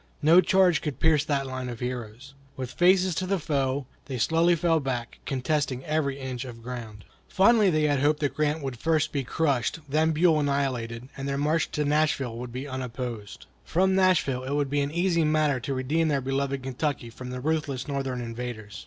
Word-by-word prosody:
No 165 +4 +7
charge 185 -5 +3
could 145 -5 -4
pierce 155 -3 +3
that 140 -2 0
line 130 -1 -5
of 120 -2 -6
heroes. 125 +1 -6 0.2
With 130 -2 -5
faces 185 +1 +4
to 185 +3 -2
the 195 +1 +1
foe, 140 -4 -1 0.2
they 135 -3 -4
slowly 165 +7 +3
fell 165 -1 +2
back, 125 -4 -4
contesting 135 -1 -1
every 145 -3 -1
inch 130 -2 -4
of 115 -3 -10
ground. 115 -4 -7 0.2
Fondly 210 +2 +4
had 180 - +3
they 150 -3 +2
hoped 150 +1 +2
that 145 - 0
Grant 150 0 0
would 130 -4 -5
first 160 0 +1
be 140 -2 -1
crushed, 135 -1 0
then 155 +3 +2
Buell 160 0 +3
annihilated, 130 -4 -2
and 135 0 -5
their 140 - -1
march 155 +3 +1
to 150 - 0
Nashville 145 -5 +1
would 125 0 -6
be 130 +4 -5
unopposed. 125 -5 -6 0.2
From 190 +3 +2
Nashville 180 -9 +2
it 130 +2 -3
would 145 -2 0
be 145 0 +2
an 140 - -1
easy 170 +1 +1
matter 155 -3 +2
to 135 +4 -3
redeem 150 +6 0
their 145 -3 +1
beloved 135 0 -2
Kentucky 135 -2 -3
from 125 +2 -8
the 125 0 -5
ruthless 145 -2 -2
Northern 135 -3 -2
invaders. 115 -3 -6
140 Hz, 195 wpm, -26 LUFS, 125-155 Hz, 0.2 s, No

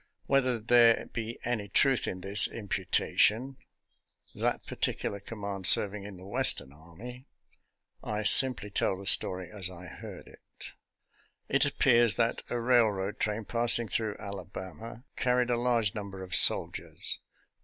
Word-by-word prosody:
Whether 130 -3 +1
there 115 +1 +3
be 115 0 -5
any 110 -4 -4
truth 135 +6 +2
in 90 - -6
this 100 +2 +5
imputation 110 +5 -1 0.4
— - - -33
that - - -2
particular 100 - -3
command 100 -2 -3
serving 100 0 +4
in 100 -2 -10
the 90 - -14
Western 85 -7 +1
army 110 - -13 0.4
— - - -45
I 105 0 -4
sim 130 +4 +7
ply 105 - -10
tell 95 -1 -1
the 100 - -11
story 90 -2 +2
as 100 -4 -5
I 90 0 -12
heard 90 - -11
it. - - -18 1.1
It 140 +2 +2
appears 120 -5 +2
that 115 -1 -1
a 120 - -3
railroad 110 -5 0
train 105 0 -2
passing 120 0 0
through 110 -1 -3
Alabama 100 - -10
car 125 0 0
ried 125 0 0
a - - +1
large 115 -5 0
number 100 -2 -8
of 90 -1 -10
soldiers. 95 - +2
105 Hz, 150 wpm, -28 LUFS, 95-120 Hz, 1.1 s, sim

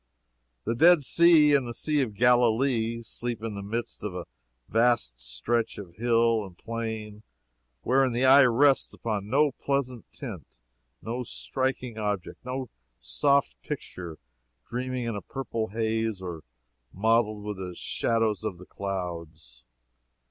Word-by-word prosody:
The 115 - -1
Dead 165 +5 +6
Sea 160 -1 +6
and 135 -3 +3
the 120 - -5
Sea 150 -2 +1
of 110 -6 -2
Galilee 120 0 +3
sleep 115 0 -5
in 115 -2 -3
the 100 - -5
midst 115 +4 -4
of 105 -4 -4
a 90 - -5 0.4
vast 115 - +2
stretch 65 - -1
of 95 -5 -9
hill 115 -1 +3
and 95 -3 -11
plain 110 -2 -5 0.6
wherein 130 +1 +3
the 120 +3 +1
eye 135 +1 +8
rests 135 +3 +3
upon 105 -3 -3
no 145 +4 +3
pleasant 130 -3 -3
tint, 105 - -9 0.4
no 120 +3 -3
striking 125 -1 -3
object, 105 -3 -3
no 130 0 -4 0.3
soft 60 - +1
picture 85 +3 -6 0.5
dreaming 125 +1 -3
in 115 -2 -2
a 105 - -4
purple 115 - -4
haze 110 -1 -1
or 90 -4 -6 0.5
mottled 110 +1 +1
with 105 -1 -4
the 90 -2 -6
shadows 115 0 0
of 105 -5 -3
the 90 - -12
clouds. 85 -11 -6
115 Hz, 140 wpm, -27 LUFS, 100-125 Hz, 0.6 s, eye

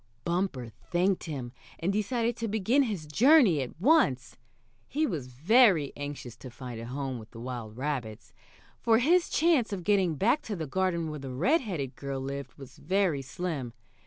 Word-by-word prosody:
Bumper 170 -9 -1 0.2
thanked 185 +1 +1
him, 135 -7 -5 0.3
and 180 +4 -1
decided 230 +3 0
to 230 - -2
begin 220 +6 +2
his 205 - -2
journey 220 - +5
at 130 +4 -7
once. 170 - +3 0.5
He 310 +2 0
was 155 - -3
very 165 - +4
anxious 145 -4 -6
to 130 - -10
find 120 -1 -8
a 115 - -7
home 135 -1 -4
with 110 0 -12
the 115 - -12
wild 120 -3 -6
rabbits, 130 -6 -4 0.5
for 225 -1 +4
his 335 +9 +3
chance 310 -9 +2
of 190 -3 -4
getting 190 -4 +2
back 230 - +2
to 210 - -5
the 165 -3 -4
garden 170 0 -1
where 150 - -6
the 135 -1 -7
red 265 - +2
headed 155 - -4
girl 140 -1 -4
lived 135 0 -6
was 135 -2 -13
very 185 -7 +1
slim. 135 -3 -4
160 Hz, 175 wpm, -29 LUFS, 130-210 Hz, 0.5 s, journey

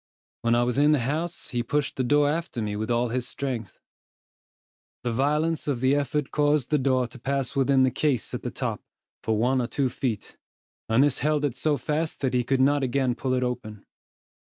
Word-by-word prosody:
When 115 0 +2
I 120 - +3
was 125 +2 0
in 150 +1 +5
the 145 - +2
house, 160 +5 -2
he 120 - 0
pushed 145 +4 -1
the 130 - 0
door 145 +3 +3
after 160 -4 -2
me 105 -2 -2
with 110 +2 -3
all 120 0 +1
his 125 +1 -2
strength. 120 -9 -4 1.3
The 120 - -1
violence 150 +7 0
of 140 -4 0
the 130 +2 +3
effort 145 0 -1
caused 145 -2 +1
the 150 - +3
door 130 -1 +2
to 125 +2 -11
pass 135 +1 -2
within 135 -1 +4
the 130 - +3
case 140 -5 0
at - - -3
the - - -3
top, - - -3 0.4
for 110 -1 0
one 125 +4 +2
or 120 - -2
two 130 +2 0
feet, 120 -5 -4 0.5
and 115 +4 +5
this 145 -2 +1
held 150 0 +1
it 135 -4 -2
so 150 +2 +1
fast 155 +5 -2
that 130 -2 0
he 125 -1 +2
could 130 +2 +1
not 145 +2 +3
again 130 -1 +1
pull 130 +2 -2
it 125 - 0
open. 110 -4 -4
130 Hz, 210 wpm, -26 LUFS, 120-145 Hz, 1.3 s, in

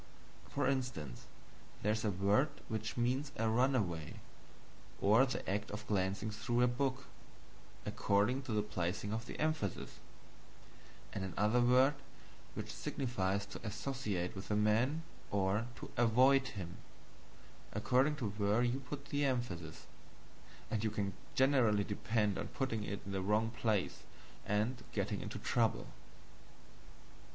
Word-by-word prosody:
For - - 0
instance, 125 - -2 0.6
there 105 - +3
is 110 +1 -1
a 110 - +2
word 100 +9 +3 0.2
which 110 0 -3
means 130 +4 +1
a 115 - 0
runaway, 110 - +1 0.8
or 110 +7 +5
the 125 - -4
act 105 +2 -1
of 105 +1 -6
glancing 100 +1 0
through 120 +3 +1
a - - +6
book, 130 +2 -1 0.8
according 105 +7 +2
to 135 -3 -6
the 105 -1 +2
placing 100 0 -2
of 115 +2 -3
the - - -7
emphasis; 155 - -1 1.1
and 100 - -3
another 105 +6 +2
word 130 +3 +5 0.6
which - - -5
signifies 100 -6 -1
to - - -8
ASSOCIATE 105 -5 -2
with 95 0 -7
a 105 - +2
man, 115 +9 +2 0.3
or 100 +3 +1
to - - -9
AVOID 130 +4 +5
him, 90 -7 -6 0.9
according 135 +4 +2
to 115 -8 -2
where 105 +3 +2
you 125 +2 +1
put 140 +1 -7
the 145 0 +1
emphasis 110 - -2 0.9
and 110 -1 0
you 110 - +2
can 100 -2 -2 0.2
generally 130 -7 +4
depend 105 0 0
on - - -3
putting 115 -5 -2
it 100 -1 -4
in 100 - -5
the 95 -1 -1
wrong 105 +4 +2
place 110 -5 0 0.5
and 110 +4 0
getting 100 -1 -1
into - - -5
trouble. 110 0 +1
110 Hz, 135 wpm, -36 LUFS, 100-125 Hz, 1.1 s, a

